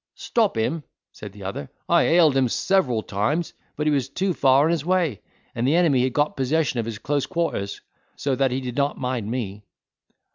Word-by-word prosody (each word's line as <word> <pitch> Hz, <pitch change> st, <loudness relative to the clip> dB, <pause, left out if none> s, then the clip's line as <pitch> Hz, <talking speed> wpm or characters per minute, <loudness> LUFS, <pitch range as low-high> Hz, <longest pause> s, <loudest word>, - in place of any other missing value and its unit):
"Stop 220 Hz, -, 0 dB
him!" 150 Hz, +8 st, -1 dB, 0.3 s
said 105 Hz, -, -9 dB
the 100 Hz, 0 st, -12 dB
other; 95 Hz, -7 st, -5 dB, 0.2 s
"I -, -, +4 dB
hailed 165 Hz, -4 st, +4 dB
him 130 Hz, -2 st, +3 dB
several 125 Hz, -, +1 dB
times, 140 Hz, -, -1 dB, 0.2 s
but 150 Hz, -, -2 dB
he 155 Hz, -, +3 dB
was 135 Hz, -3 st, 0 dB
too 185 Hz, +6 st, -1 dB
far 135 Hz, -1 st, +4 dB
on 160 Hz, -, +2 dB
his 165 Hz, -4 st, 0 dB
way, 175 Hz, -, 0 dB, 0.3 s
and 120 Hz, +2 st, -1 dB
the 150 Hz, -, +3 dB
enemy 160 Hz, -7 st, +4 dB
had 130 Hz, -1 st, 0 dB
got 145 Hz, 0 st, +1 dB
possession 135 Hz, 0 st, 0 dB
of 115 Hz, -, -2 dB
his 115 Hz, -2 st, -4 dB
close 145 Hz, +5 st, -1 dB
quarters; 165 Hz, -, -2 dB, 0.3 s
so 140 Hz, -, -1 dB
that 135 Hz, 0 st, +2 dB
he 130 Hz, +2 st, -2 dB
did 125 Hz, -2 st, -5 dB
not 140 Hz, 0 st, +1 dB
mind 125 Hz, -5 st, -3 dB
me." 105 Hz, -4 st, -4 dB
135 Hz, 205 wpm, -23 LUFS, 115-160 Hz, 0.3 s, I